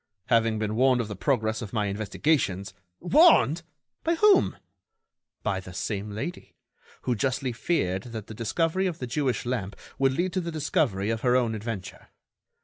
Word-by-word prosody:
"Having 115 -2 +3
been 110 0 -2
warned 130 +1 +4
of 115 -3 -2
the 105 - -5
progress 110 -1 0
of 110 -2 -7
my 105 -3 +1
investigations——" 100 - 0 0.3
"Warned! 180 - +5 0.4
by 335 +1 +2
whom?" 405 +2 +4 0.9
"By 100 -3 0
the 95 -1 -10
same 105 +1 -3
lady, 110 +13 -6 0.5
who 125 - +1
justly 130 +3 -1
feared 110 - 0
that 110 -3 -6
the 110 - -9
discovery 165 - 0
of 170 -3 -3
the 125 - -4
Jewish 125 -2 -1
lamp 115 -6 -3 0.2
would 135 -1 +3
lead 175 +6 -1
to 185 - 0
the 170 -1 -4
discovery 125 -9 0
of 115 -1 -2
her 125 -1 +3
own 120 -3 +2
adventure. 110 -3 -6
120 Hz, 165 wpm, -27 LUFS, 105-150 Hz, 0.9 s, Warned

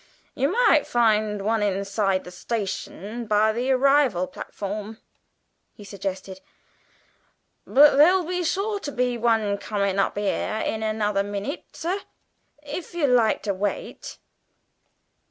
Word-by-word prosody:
"You 275 +2 0
might 420 -9 +4
find 215 -3 +1
one 220 +1 +1
inside 195 -1 0
the 180 - -10
station 210 +3 -5
by 215 +1 +3
the 245 +4 -2
arrival 265 -7 +3
platform," 210 +3 -6 0.8
he 210 - -12
suggested; 190 -1 -6 1.3
"but 285 0 +6
there'll 355 +4 +5
be 360 +1 -2
sure 400 +5 -1
to 290 - -5
be 250 -2 0
one 220 -3 +1
comin' 200 -2 -1
up 195 - 0
here 205 +1 -1
in 220 - -2
another 215 -2 0
minute, 205 +7 -4
sir, 355 +4 -2 0.6
if 305 +4 -7
you 335 -4 +1
like 245 -4 +3
to 200 - -1
wait." 200 +2 -4
220 Hz, 125 wpm, -24 LUFS, 200-275 Hz, 1.3 s, but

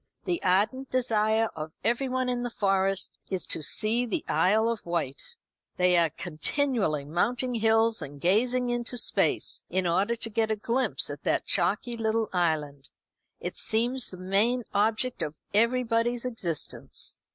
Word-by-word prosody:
The 345 -2 -1
ardent 210 +9 +1
desire 225 -3 +1
of 155 0 -6
everyone 255 +2 0
in 245 -1 -1
the 245 - -2
Forest 195 -3 -1
is 190 -2 -2
to - - +1
see 220 - +2
the 310 +8 -3
Isle 215 +4 +3
of 230 -2 -2
Wight. 170 - -4 0.4
They 180 -1 +3
are 170 -2 +4
continually 175 - -1
mounting 240 - 0
hills 225 -1 +2
and 145 -1 -8
gazing 245 - +2
into 240 0 -3
space, - - +2
in 185 0 0
order 190 +7 +1
to 225 0 -3
get 220 +1 0
a 220 - +1
glimpse 235 +5 0
at - - -8
that - - +1
chalky 240 -1 +1
little 220 0 0
island. 150 -5 -1 0.5
It - - -5
seems 245 +3 +2
the 185 - -10
main 205 +7 +1
object 220 +5 +1
of 150 +1 -3 0.2
everybody's 235 +1 +1
existence." 185 - -3
220 Hz, 150 wpm, -27 LUFS, 180-245 Hz, 0.5 s, are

